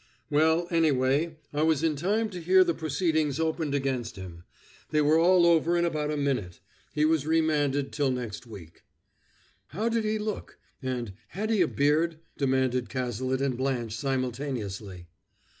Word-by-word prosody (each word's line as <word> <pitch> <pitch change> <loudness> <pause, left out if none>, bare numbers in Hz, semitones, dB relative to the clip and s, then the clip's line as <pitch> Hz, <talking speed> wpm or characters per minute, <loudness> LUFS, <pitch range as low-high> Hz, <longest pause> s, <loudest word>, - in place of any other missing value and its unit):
"Well, 160 +3 +3
anyway, 155 0 +2 0.2
I 145 - 0
was 160 -1 +2
in 160 -2 +2
time 210 +8 0
to 180 -2 -6
hear 185 +3 +5
the 170 -2 0
proceedings 155 -1 0
opened 160 -2 -1
against 130 -4 -2
him. 90 -3 -10 0.4
They 155 - +1
were 150 +2 +4
all 175 +1 +5
over 170 0 +3
in 170 - +2
about 150 -3 -1
a 150 - -1
minute. 125 -12 -2 0.3
He 150 0 +1
was 155 -2 +1
remanded 150 -4 +1
till 145 -2 0
next 125 -2 -4
week." 90 -7 -12 0.9
"How 210 - -2
did 230 -1 0
he 215 0 0
look?" 215 0 -5 0.2
and, 125 -6 -3
"Had 215 - -3
he 215 -4 +3
a 170 - +4
beard?" 155 +4 +1 0.2
demanded 130 -3 0
Cazalet 130 +2 -2
and 135 -3 0
Blanche 125 -4 -2
simultaneously. 120 -8 -3
145 Hz, 160 wpm, -27 LUFS, 130-165 Hz, 0.9 s, hear